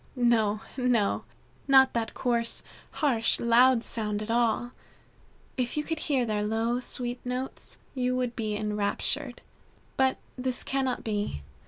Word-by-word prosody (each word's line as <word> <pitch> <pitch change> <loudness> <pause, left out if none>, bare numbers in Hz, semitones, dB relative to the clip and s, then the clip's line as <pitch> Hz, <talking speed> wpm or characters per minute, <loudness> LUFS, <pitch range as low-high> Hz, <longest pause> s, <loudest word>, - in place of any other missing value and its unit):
No, 225 -4 +2 0.2
no! 245 -5 +1 0.4
Not 265 -1 +6
that 230 -1 -2
coarse, 235 -2 +1 0.4
harsh, 230 -5 +3
loud 235 +1 +5
sort 210 -3 -2
at 220 - -4
all. 240 +1 +1 0.9
If 250 +2 -1
you 300 - +1
could 325 0 -3
hear 270 -6 +1
their 215 -2 -1
low, 225 +3 0
sweet 245 0 -4
notes, 250 +1 -5 0.2
you 255 -1 0
would 250 -2 -1
be 215 -2 -2
enraptured. 210 +6 -1 0.6
But 265 0 +3 0.2
this 255 0 -2
cannot 265 -2 -1
be. 205 - -2
240 Hz, 135 wpm, -28 LUFS, 220-255 Hz, 0.9 s, Not